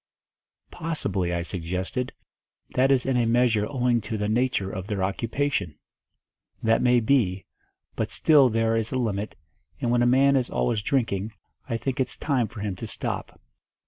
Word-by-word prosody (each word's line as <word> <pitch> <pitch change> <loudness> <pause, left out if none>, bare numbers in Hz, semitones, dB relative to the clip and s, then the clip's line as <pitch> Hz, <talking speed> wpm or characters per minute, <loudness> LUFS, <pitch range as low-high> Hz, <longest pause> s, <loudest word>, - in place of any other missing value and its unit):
"Possibly," 100 - -2
I 85 0 -1
suggested, 90 +8 -3 0.6
"that 130 +1 +3
is 135 -2 +3
in 135 - +1
a 120 -2 +2
measure 115 -3 +3
owing 125 -4 +1
to 110 +1 -4
the 105 0 -1
nature 110 -3 0
of 95 0 -6
their 100 -3 -2
occupation." 100 - -1 0.9
"That 115 0 +3
may 125 -1 +4
be, 110 -6 +1 0.5
but - - -2
still 145 -5 +5
there 115 0 +1
is 115 0 -1
a 130 - -1
limit, 105 -4 -2 0.4
and 120 - 0
when 120 0 +3
a 120 - +4
man 135 +3 +4
is 130 -2 +1
always 60 - 0
drinking, 110 -4 -1 0.4
I 115 - 0
think 130 +4 -3
it's 130 - -1
time 135 -6 0
for 110 -2 -9
him 100 -3 -2
to - - -6
stop." - - -5
115 Hz, 170 wpm, -25 LUFS, 100-125 Hz, 0.9 s, still